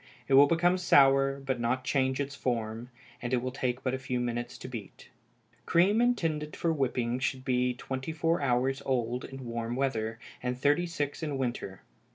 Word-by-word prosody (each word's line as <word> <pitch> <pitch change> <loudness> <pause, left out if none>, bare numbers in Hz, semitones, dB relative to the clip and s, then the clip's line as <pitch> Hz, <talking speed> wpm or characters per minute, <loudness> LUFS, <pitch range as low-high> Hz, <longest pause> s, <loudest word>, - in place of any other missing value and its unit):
It 135 - 0
will 140 +2 +8
become 175 +3 +3
sour, 135 -4 +5
but 135 -2 -2
not 125 +2 0
change 130 -1 +1
its 140 0 -2
form; 115 -3 -3 0.3
and 120 +1 -3
it - - +4
will 130 +1 -2
take 125 -1 -2
but 130 - 0
a 130 - -2
few 130 -1 -2
minutes 120 0 -3
to - - -8
beat. 115 -6 -9 0.6
Cream 195 +7 +4
intended 165 -11 0
for 165 -1 0
whipping 125 -4 0
should 130 0 -2
be 125 -1 +1
twenty 130 +3 -4
four 165 +1 0
hours 135 0 +1
old 125 -1 -1
in 135 -1 -8
warm 115 0 -3
weather, 115 -4 -1 0.2
and 125 0 -2
thirty 145 +6 +2
six 145 -3 -3
in 150 -3 -2
winter. 120 -7 -4
130 Hz, 185 wpm, -29 LUFS, 125-145 Hz, 0.6 s, will